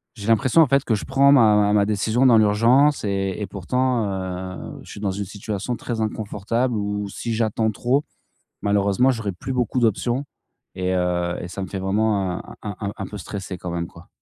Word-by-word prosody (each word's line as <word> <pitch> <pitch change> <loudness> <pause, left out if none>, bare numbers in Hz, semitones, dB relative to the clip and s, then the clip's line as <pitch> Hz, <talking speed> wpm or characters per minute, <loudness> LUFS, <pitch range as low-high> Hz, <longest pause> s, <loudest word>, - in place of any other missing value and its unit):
j'ai 100 -2 -8
l'impression, 115 +7 +4
en - - +5
fait, 140 0 +2
que 115 - +1
je 105 - -3
prends 135 +1 +4
ma 110 -6 +6
ma 105 0 +3
ma 105 -1 +3
décision 110 +5 +2
dans 120 - +7
l'urgence 115 +7 +4
et 95 -2 -1
et 105 - -3
pourtant, 125 +4 0
heu, 95 -1 -5
je - - -14
suis - - -9
dans 100 -2 0
une 100 +1 -3
situation 105 +4 -4
très 115 -2 -4
inconfortable 110 +3 -1
où 105 0 -2
si 115 +4 -4
j'attends 110 0 +1
trop, 125 +7 0 0.6
malheureusement 100 +5 +2
j'aurais 110 -5 -2
plus 130 +9 -6
beaucoup 125 0 0
d'options 120 +4 +1 0.5
et 90 0 -1
heu 90 -1 0
et 85 - -6
ça 95 +2 -6
me 95 - -5
fait 95 - -4
vraiment 95 -1 0
un - - -11
un 100 0 -4
un 100 - -5
peu 105 +1 -8
stresser 95 -1 -6
quand 90 0 -6
même, 85 0 -2
quoi. 85 +1 -16
105 Hz, 205 wpm, -22 LUFS, 95-120 Hz, 0.6 s, dans